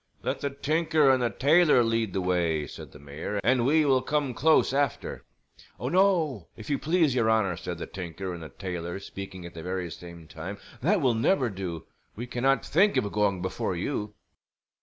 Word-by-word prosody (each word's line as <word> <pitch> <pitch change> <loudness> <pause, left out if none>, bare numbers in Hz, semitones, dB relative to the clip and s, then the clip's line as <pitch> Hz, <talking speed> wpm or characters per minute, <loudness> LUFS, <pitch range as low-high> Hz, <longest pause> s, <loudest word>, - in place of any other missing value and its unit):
"Let - - -2
the 140 - -1
tinker 155 +1 +2
and 130 -1 +2
the 120 - +2
tailor 145 +1 +4
lead 115 -3 0
the 95 - 0
way," 85 -4 0
said - - -10
the - - -13
mayor, 75 +8 -5
"and 125 0 +3
we 155 +2 +4
will 135 -2 +3
come 145 -1 -1
close 155 +1 +3
after." 140 0 -1 0.5
"Oh, - - -2
no, 170 - +2
if 110 +6 -7
you 140 - +1
please, 160 -3 +2
your 115 -3 +2
honor," 105 -5 +2
said 90 0 -6
the 85 - -5
tinker 90 0 -6
and 85 - -8
the 80 - -8
tailor 90 -2 -5
speaking 95 -2 -8
at 85 - -9
the 80 - -8
very 90 0 -4
same 85 -1 -10
time. 90 +7 -7 0.2
"That 185 +7 +2
will 130 -4 +3
never 120 - +2
do. 90 -4 -5 0.3
We 120 - -5
cannot 125 +1 +1
think 200 +6 +3
of 100 - 0
going 100 -3 0
before 95 0 -2
you." 105 +2 -3
110 Hz, 195 wpm, -27 LUFS, 90-140 Hz, 0.5 s, tailor